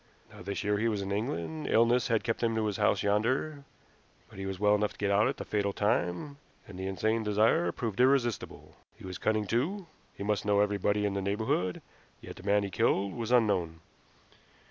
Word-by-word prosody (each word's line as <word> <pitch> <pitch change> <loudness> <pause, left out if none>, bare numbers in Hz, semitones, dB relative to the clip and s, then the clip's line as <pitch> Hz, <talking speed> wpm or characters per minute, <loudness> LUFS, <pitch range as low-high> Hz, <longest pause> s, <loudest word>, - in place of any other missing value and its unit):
Now - - -12
this 100 +3 -4
year 105 0 +1
he 115 - +1
was 105 -3 -1
in 95 - -5
England; 110 - -3
illness 115 +2 +3
had 115 -2 +1
kept 115 - -2
him 115 -1 +1
to 110 -1 0
his 105 -2 -2
house - - +2
yonder, 130 +8 0 0.7
but - - -11
he 95 - -4
was 95 -1 -5
well 105 0 +4
enough 105 0 +1
to - - -20
get 100 -1 0
out 100 +2 +4
at - - -2
the - - -6
fatal 100 -1 -1
time, 105 - -1 0.3
and 95 -2 -10
the 95 - -3
insane 110 +4 0
desire 105 -4 +2
proved 110 +2 -4
irresistible. 125 -4 +1 0.2
He - - -12
was 95 -1 -6
cunning 110 -1 0
too. 160 - -1 0.3
He - - -6
must 105 -1 0
know 100 0 +2
everybody 105 0 +1
in 100 - 0
the 100 - -2
neighborhood, 100 -2 -1 0.4
yet - - -10
the - - -10
man 100 +1 +2
he 100 - -4
killed 100 -3 +1
was 115 -1 -4
unknown. 95 -9 +2
105 Hz, 210 wpm, -30 LUFS, 100-115 Hz, 0.7 s, well